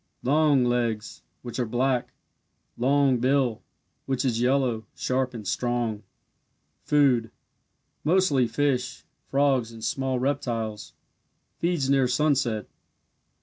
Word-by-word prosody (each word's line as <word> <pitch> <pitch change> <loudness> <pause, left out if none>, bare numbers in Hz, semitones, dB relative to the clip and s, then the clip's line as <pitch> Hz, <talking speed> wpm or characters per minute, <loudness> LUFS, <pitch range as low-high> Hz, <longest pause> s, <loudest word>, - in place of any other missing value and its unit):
Long 145 0 +3
legs, 120 -3 -1 0.2
which 120 +1 -6
are 125 - +1
black. 125 +2 0 0.6
Long 135 0 +2
bill, 130 -2 +1 0.5
which 135 0 -1
is 120 -3 0
yellow, 125 -4 +1
sharp, 130 -1 -1
and 105 -4 -7
strong. 120 -2 -1 0.8
Food 130 -6 +3 0.7
mostly 155 -6 +3
fish, 130 -1 -1 0.3
frogs, 135 -4 +2
and 115 -1 -11
small 135 -1 -1
reptiles. 120 -5 -2 0.7
Feeds 170 -5 0
near 135 -2 +3
sunset. 125 -5 +1
130 Hz, 105 wpm, -26 LUFS, 120-140 Hz, 0.8 s, Long